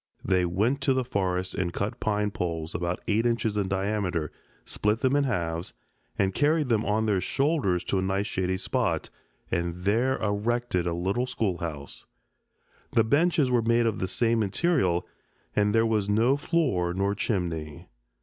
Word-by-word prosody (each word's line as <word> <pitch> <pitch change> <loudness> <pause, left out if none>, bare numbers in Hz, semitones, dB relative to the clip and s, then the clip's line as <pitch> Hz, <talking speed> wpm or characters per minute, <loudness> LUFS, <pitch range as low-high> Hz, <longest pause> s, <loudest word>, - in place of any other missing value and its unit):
They 90 -2 +2
went 110 +11 0
to 135 -1 +2
the 130 - +1
forest 95 -6 -1
and 90 -2 -1
cut 100 +4 -3
pine 105 -1 0
poles 85 -3 -3
about 85 0 -2
eight 110 +3 +2
inches 115 -2 0
in 100 -2 0
diameter, 95 -5 -1 0.3
split 105 +2 0
them 130 +1 +2
in 145 -1 +3
halves, 85 -7 -2 0.4
and 95 -1 +1
carried 150 - +2
them 110 -2 +2
on 110 +1 +1
their 100 -4 +1
shoulders 135 - +1
to 95 - 0
a - - 0
nice 95 +2 0
shady 95 -2 -1
spot, - - -1 0.4
and 85 +1 -2
there 120 +7 +2
erected 105 -2 0
a 85 - 0
little 95 +9 -1
schoolhouse. 85 - -3 0.9
The 115 - +5
benches 145 +2 +2
were 120 -1 +3
made 115 +1 +2
of 115 - 0
the 95 - -1
same 115 +4 +1
material, 100 - +1 0.5
and 105 0 +3
there 115 +1 +3
was 105 -3 0
no 115 +6 +3
floor 130 - 0
nor 100 +1 +1
chimney. 85 - -3
105 Hz, 165 wpm, -27 LUFS, 90-120 Hz, 0.9 s, The